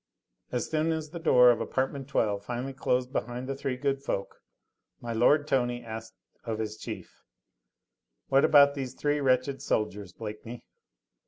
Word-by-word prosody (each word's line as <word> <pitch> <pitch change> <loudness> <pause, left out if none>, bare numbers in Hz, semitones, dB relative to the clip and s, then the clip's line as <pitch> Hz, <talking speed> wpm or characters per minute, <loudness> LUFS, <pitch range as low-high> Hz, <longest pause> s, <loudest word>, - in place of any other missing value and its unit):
As 125 -2 -1
soon 160 +1 0
as 160 -2 -3
the 170 - -6
door 125 -6 +6
of 115 -1 -1
apartment 135 +3 -2
No. - - -20
12 100 -2 -2
finally 125 +4 -4
closed 125 -1 0
behind 125 +1 -3
the 135 - -2
three 135 -1 -3
good 135 0 -1
folk, 100 -8 -4 0.6
my 120 -1 -5
lord 145 +6 +4
Tony 120 -3 0
asked 110 0 -7 0.3
of 115 -2 -3
his 110 -1 -3
chief: - - -8 1.1
"What 135 0 +4
about 145 -2 +7
these 135 -3 -5
three 145 0 0
wretched 135 0 +1
soldiers, 105 -3 -2
Blakeney?" 110 +3 -8
125 Hz, 160 wpm, -28 LUFS, 115-140 Hz, 1.1 s, about